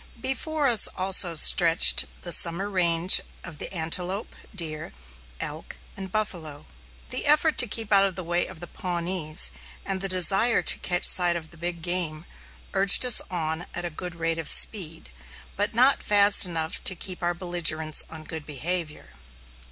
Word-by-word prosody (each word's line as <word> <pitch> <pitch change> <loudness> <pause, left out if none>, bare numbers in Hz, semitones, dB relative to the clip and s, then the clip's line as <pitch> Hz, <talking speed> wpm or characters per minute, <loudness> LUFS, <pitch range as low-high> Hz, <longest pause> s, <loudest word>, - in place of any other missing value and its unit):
Before 285 +4 -3
us 235 -5 +3
also 185 -2 +3
stretched 165 +1 +5 0.2
the 175 - -6
summer 170 +4 +3
range 175 -1 +2 0.2
of 165 -4 -12
the - - -6
antelope, 180 +4 -3 0.2
deer, 155 -4 -5 0.5
elk, - - -8 0.2
and 190 -1 -9
buffalo. 165 -9 -5 0.5
The - - -2
effort 305 +2 +2
to 245 - +3
keep 220 0 -4
out 195 0 +4
of 190 -2 -4
the 185 - -7
way 175 +1 -2
of 180 -3 -13
the - - -7
Pawnees, 170 - -3 0.3
and 190 -1 -5
the 195 - -4
desire 195 +6 +2
to - - +3
catch 175 -1 -3
sight 175 -1 +6
of 160 -2 -9
the - - -14
big 170 0 -7
game, 175 -3 -2 0.5
urged 195 +5 +6
us 245 - +6
on 165 -1 -5
at 175 - -5
a 175 - -6
good 175 +2 -9
rate 165 0 -4
of 165 - 0
speed, 165 - +2 0.4
but 205 +2 -3
not 255 +4 +3
fast 205 -1 +3
enough 160 -2 -6
to 185 - +4
keep 180 +1 -7
our 175 0 -3
belligerents 165 -3 -2
on 160 -1 -11
good 160 0 -9
behavior. 155 +2 -5
175 Hz, 165 wpm, -23 LUFS, 165-195 Hz, 0.5 s, sight